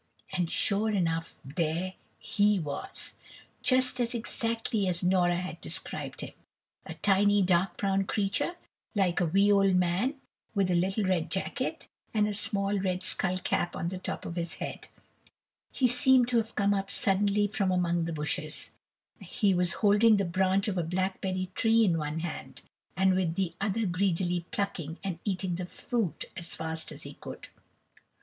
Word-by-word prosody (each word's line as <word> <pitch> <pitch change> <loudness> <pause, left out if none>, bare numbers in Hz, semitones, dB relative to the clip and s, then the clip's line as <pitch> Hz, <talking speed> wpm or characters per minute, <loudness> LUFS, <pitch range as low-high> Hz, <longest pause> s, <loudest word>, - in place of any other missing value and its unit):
And 180 -3 0
sure 205 +4 +2
enough 165 -5 -1
there 165 +6 -2 0.2
"he" 210 -3 +2
was, 145 -4 -5 0.2
and - - -17 0.3
just 255 -1 +3 0.2
exactly 225 -2 -1
as 180 0 -1
Nora 180 -1 +3
had 180 +1 -5
described - - -5
him. - - -7 0.5
A - - -6
tiny 205 0 +3
dark 180 +1 +2
brown 195 -1 +1
creature, 210 - 0 0.4
like 190 -3 +2
a 175 - +2
wee 195 +5 +4
old 195 -2 +4
man, 180 - +1 0.4
with 195 -2 +2
a - - +3
little 190 +4 +1
red 180 -4 0
jacket, 190 - -3 0.3
and 210 -1 +3
a 210 - -2
small 200 0 0
red 185 -1 -1
skull 185 -1 +1
cap 175 -1 -1
on 170 - -2
the 185 0 -5
top - - -5
of 170 - -5
his 170 -1 -2
head. - - -6 0.8
He 260 - +2
seemed 250 0 +5
to 245 - +2
have 225 -1 -1
come 200 -1 +3
up 195 0 -2
suddenly 205 +1 +2
from 200 -1 0
among 175 -2 +1
the 165 - -3
bushes; 155 +1 -3 0.5
he 205 -5 +1
was 180 -1 +2
holding 210 +2 +6
the 200 - +1
branch 190 +3 +1
of 190 -3 0
a - - 0
blackberry 185 +1 -2
tree 225 +2 +4
in 170 -4 +2
one 150 +1 -3
hand, 170 -1 -6 0.4
and 190 0 +4
with 180 -3 0
the 185 -3 -1
other 210 +2 0
greedily 180 -2 0
plucking 175 -5 -3
and 185 -4 -3
eating 185 -3 -1
the 180 - -3
fruit 220 0 -3
as 175 -2 -6
fast 160 0 -5
as - - -8
he - - -8
could. - - -10
190 Hz, 170 wpm, -29 LUFS, 175-205 Hz, 0.8 s, holding